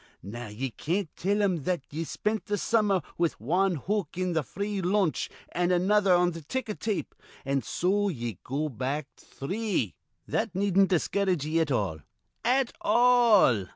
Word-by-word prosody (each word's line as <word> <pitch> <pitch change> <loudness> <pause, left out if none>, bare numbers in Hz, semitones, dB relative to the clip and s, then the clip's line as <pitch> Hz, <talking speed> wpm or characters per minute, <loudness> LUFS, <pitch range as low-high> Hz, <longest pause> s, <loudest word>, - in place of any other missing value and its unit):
Now 115 +5 -7
ye 120 +5 -4
can't 170 - -2
tell 205 +3 +1
him 190 -4 +2
that 180 -4 0
ye 160 +3 -3
spent 215 +7 -2
th' 205 -1 0
summer 205 -6 +2 0.2
with 170 -2 0
wan 180 - +1
hook 200 +9 -2
on 185 -1 0
th' 160 -2 +1
free 200 +3 -3
lunch 185 -2 +1 0.2
an' 175 +1 +1
another 195 +2 +3
on 175 0 +3
th' 165 -1 -8
ticker 255 -5 -2
tape, 215 -1 -3 0.3
an' 135 0 +1
so 200 +7 0
ye 120 - -4
go 145 +4 -2
back 135 +2 -3
three. 185 - -3 0.3
That 220 -4 -1
needn't 195 0 +3
discourage 185 -2 +1
ye 160 +2 +1
at 160 -2 +1
all, 100 -10 0 0.4
at 255 +1 +2
all. 230 - +5
180 Hz, 160 wpm, -28 LUFS, 145-205 Hz, 0.4 s, all